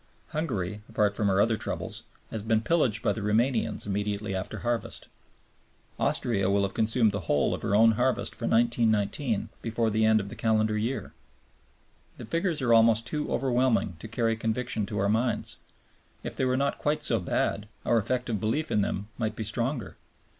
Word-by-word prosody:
Hungary, 105 Hz, -, -3 dB
apart 105 Hz, -1 st, +1 dB
from 105 Hz, -, +1 dB
her 95 Hz, 0 st, +2 dB
other 110 Hz, +1 st, +3 dB
troubles, -, -, -4 dB, 0.3 s
has 110 Hz, -, -3 dB
been 110 Hz, +1 st, +1 dB
pillaged 120 Hz, -6 st, +2 dB
by -, -, +2 dB
the 110 Hz, -, -5 dB
Romanians 115 Hz, +4 st, 0 dB
immediately 105 Hz, 0 st, -2 dB
after 95 Hz, 0 st, -4 dB
harvest. 120 Hz, -1 st, -3 dB, 0.9 s
Austria 100 Hz, -6 st, +1 dB
will 100 Hz, 0 st, +2 dB
have 100 Hz, -, -1 dB
consumed 110 Hz, 0 st, +2 dB
the 100 Hz, -, -2 dB
whole 70 Hz, -, +2 dB
of -, -, -4 dB
her 100 Hz, -, 0 dB
own 115 Hz, +2 st, +6 dB
harvest 125 Hz, +3 st, 0 dB
for 115 Hz, -, -3 dB
1919 115 Hz, 0 st, +1 dB
before 115 Hz, -1 st, 0 dB
the 110 Hz, +1 st, +1 dB
end 110 Hz, 0 st, +5 dB
of 100 Hz, -1 st, -5 dB
the -, -, -8 dB
calendar 110 Hz, -1 st, +1 dB
year. 115 Hz, +5 st, -3 dB, 1.0 s
The -, -, -8 dB
figures 165 Hz, -, -1 dB
are 120 Hz, -2 st, +4 dB
almost 115 Hz, 0 st, +5 dB
too 150 Hz, +3 st, -2 dB
overwhelming 125 Hz, -7 st, +1 dB
to 110 Hz, -, -8 dB
carry 115 Hz, 0 st, 0 dB
conviction 115 Hz, 0 st, -2 dB
to 105 Hz, -, -4 dB
our 100 Hz, -, +1 dB
minds; 115 Hz, +3 st, 0 dB, 0.7 s
if -, -, -5 dB
they 130 Hz, -, 0 dB
were 130 Hz, 0 st, +1 dB
not 140 Hz, +1 st, 0 dB
quite 150 Hz, 0 st, 0 dB
so 115 Hz, -6 st, +5 dB
bad, 100 Hz, +3 st, -1 dB, 0.2 s
our 115 Hz, -, +3 dB
effective 120 Hz, 0 st, -1 dB
belief 115 Hz, +10 st, -1 dB
in 105 Hz, -, +2 dB
them 100 Hz, 0 st, -2 dB
might 110 Hz, -2 st, -1 dB
be 110 Hz, -, -4 dB
stronger. 115 Hz, +2 st, -3 dB
110 Hz, 180 wpm, -27 LUFS, 105-120 Hz, 1.0 s, own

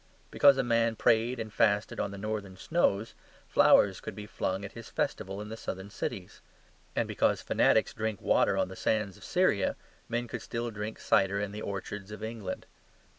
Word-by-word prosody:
Because 140 Hz, -1 st, +6 dB
a 135 Hz, -, +2 dB
man 115 Hz, -1 st, +2 dB
prayed 115 Hz, +3 st, +2 dB
and 110 Hz, -2 st, -5 dB
fasted 105 Hz, 0 st, +2 dB
on 100 Hz, -, 0 dB
the 100 Hz, -, -8 dB
Northern 100 Hz, -2 st, -4 dB
snows, 110 Hz, -, +1 dB, 0.3 s
flowers 95 Hz, -2 st, +5 dB
could -, -, -6 dB
be 105 Hz, -, -7 dB
flung 100 Hz, -2 st, -2 dB
at 100 Hz, -, -8 dB
his 115 Hz, -1 st, -10 dB
festival 95 Hz, +1 st, -2 dB
in 105 Hz, 0 st, -6 dB
the 110 Hz, -, -5 dB
Southern 95 Hz, -2 st, -6 dB
cities; 95 Hz, -2 st, -5 dB, 0.5 s
and -, -, +1 dB
because -, -, +1 dB
fanatics -, -, +3 dB
drank 110 Hz, -2 st, -2 dB
water -, -, +3 dB
on -, -, +2 dB
the -, -, -9 dB
sands 105 Hz, -4 st, 0 dB
of -, -, -15 dB
Syria, -, -, +2 dB, 0.3 s
men 120 Hz, +1 st, -1 dB
could -, -, -5 dB
still 120 Hz, 0 st, -3 dB
drink 105 Hz, +1 st, -5 dB
cider 100 Hz, -1 st, +2 dB
in 100 Hz, -1 st, -2 dB
the 105 Hz, +1 st, -6 dB
orchards 100 Hz, 0 st, -5 dB
of 105 Hz, 0 st, -8 dB
England. 110 Hz, -2 st, -5 dB
105 Hz, 185 wpm, -30 LUFS, 100-115 Hz, 0.5 s, Because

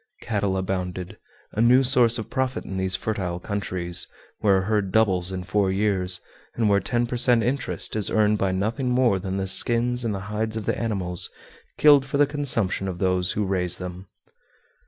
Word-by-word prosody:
Cattle 100 Hz, -4 st, -1 dB
abounded 90 Hz, -1 st, -4 dB, 0.3 s
a 110 Hz, -, -2 dB
new 125 Hz, +3 st, +5 dB
source 125 Hz, -2 st, +4 dB
of 110 Hz, -, -7 dB
profit 130 Hz, 0 st, -2 dB
in 95 Hz, -, -5 dB
these 95 Hz, 0 st, +1 dB
fertile 95 Hz, -4 st, -3 dB
countries, 90 Hz, -3 st, -1 dB, 0.3 s
where 100 Hz, -2 st, +3 dB
a -, -, +1 dB
herd 105 Hz, -1 st, -1 dB
doubles 95 Hz, -4 st, +2 dB
in 95 Hz, -1 st, -4 dB
four 95 Hz, +1 st, 0 dB
years, 95 Hz, -2 st, 0 dB, 0.4 s
and 115 Hz, -2 st, +1 dB
where 100 Hz, -1 st, +4 dB
ten 120 Hz, +5 st, -1 dB
per 120 Hz, +1 st, -4 dB
cent. 120 Hz, -1 st, +4 dB
interest 125 Hz, 0 st, -2 dB
is 105 Hz, -2 st, +2 dB
earned 105 Hz, -1 st, +2 dB
by 95 Hz, -1 st, +1 dB
nothing 110 Hz, +8 st, -1 dB
more 125 Hz, -6 st, +2 dB
than 95 Hz, 0 st, -4 dB
the 95 Hz, -, -2 dB
skins 120 Hz, +5 st, +2 dB
and 110 Hz, -3 st, -1 dB
the 95 Hz, -, -5 dB
hides 110 Hz, +2 st, -3 dB
of 110 Hz, -, -5 dB
the -, -, 0 dB
animals 95 Hz, -6 st, -3 dB, 0.5 s
killed 145 Hz, -2 st, +6 dB
for 135 Hz, +1 st, -3 dB
the 145 Hz, -, +5 dB
consumption 125 Hz, -10 st, -1 dB
of 90 Hz, -2 st, -4 dB
those 90 Hz, 0 st, +1 dB
who 105 Hz, -, -1 dB
raise 90 Hz, -2 st, 0 dB
them! 90 Hz, +1 st, -8 dB
100 Hz, 190 wpm, -24 LUFS, 95-115 Hz, 0.5 s, killed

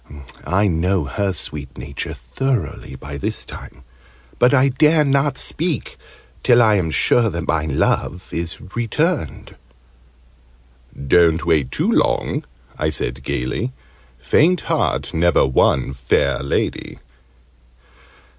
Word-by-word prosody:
I 100 Hz, +3 st, +2 dB
know 90 Hz, 0 st, +1 dB
her 100 Hz, +7 st, -1 dB
sweet 75 Hz, -5 st, -5 dB
nature, 70 Hz, +3 st, -5 dB
thoroughly, 80 Hz, -, -3 dB
by 70 Hz, +1 st, -8 dB
this -, -, -3 dB
time. 70 Hz, -, -11 dB, 0.6 s
But 125 Hz, +1 st, +5 dB
I 135 Hz, 0 st, +4 dB
dare 150 Hz, +4 st, +3 dB
not 140 Hz, 0 st, +1 dB
speak 165 Hz, -4 st, -3 dB, 0.5 s
till 120 Hz, -1 st, +5 dB
I 110 Hz, -3 st, +5 dB
am 90 Hz, -5 st, +1 dB
sure 115 Hz, +8 st, +3 dB
that 85 Hz, -3 st, -5 dB
my 75 Hz, 0 st, 0 dB
love 80 Hz, +4 st, -1 dB
is 85 Hz, 0 st, -3 dB
returned." 120 Hz, -, -2 dB, 1.5 s
"Don't 85 Hz, +2 st, +4 dB
wait 75 Hz, -6 st, +2 dB
too -, -, 0 dB
long!" -, -, +1 dB, 0.4 s
I -, -, +1 dB
said 65 Hz, +2 st, -3 dB
gaily. 70 Hz, -, -3 dB, 0.4 s
"Faint 160 Hz, -, +2 dB
heart -, -, -1 dB
never 85 Hz, -1 st, +3 dB
won 65 Hz, 0 st, +2 dB
fair 65 Hz, -2 st, 0 dB
lady!" 70 Hz, -, -2 dB
85 Hz, 115 wpm, -20 LUFS, -, 1.5 s, But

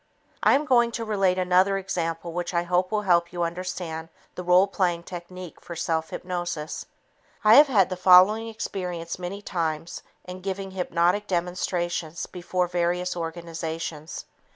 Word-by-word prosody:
I -, -, +5 dB
am 290 Hz, +2 st, +1 dB
going 240 Hz, -3 st, +4 dB
to 230 Hz, -1 st, -3 dB
relate 195 Hz, -4 st, +1 dB
another 185 Hz, +2 st, +3 dB
example 170 Hz, -3 st, -3 dB
which 175 Hz, +1 st, -3 dB
I 170 Hz, -, +2 dB
hope 180 Hz, +2 st, 0 dB
will 210 Hz, -1 st, 0 dB
help 170 Hz, -3 st, +3 dB
you 175 Hz, -1 st, -2 dB
understand 170 Hz, -2 st, -4 dB, 0.2 s
the -, -, -6 dB
role 180 Hz, +2 st, +5 dB
playing 180 Hz, -4 st, -1 dB
technique 180 Hz, 0 st, -9 dB
for 170 Hz, -, -8 dB
self 160 Hz, -1 st, -1 dB
hypnosis. 175 Hz, -4 st, -4 dB, 0.6 s
I 215 Hz, 0 st, +7 dB
have 290 Hz, +4 st, +9 dB
had 205 Hz, -9 st, +3 dB
the -, -, -1 dB
following 185 Hz, +5 st, +6 dB
experience 180 Hz, -6 st, -5 dB
many 190 Hz, +3 st, -6 dB
times 165 Hz, -3 st, -3 dB, 0.2 s
in 180 Hz, 0 st, -8 dB
giving 195 Hz, 0 st, -4 dB
hypnotic 180 Hz, +2 st, +1 dB
demonstrations 175 Hz, -2 st, -2 dB
before 180 Hz, 0 st, -2 dB
various 180 Hz, +1 st, -1 dB
organizations. 165 Hz, -2 st, -5 dB
180 Hz, 150 wpm, -25 LUFS, 170-190 Hz, 0.6 s, have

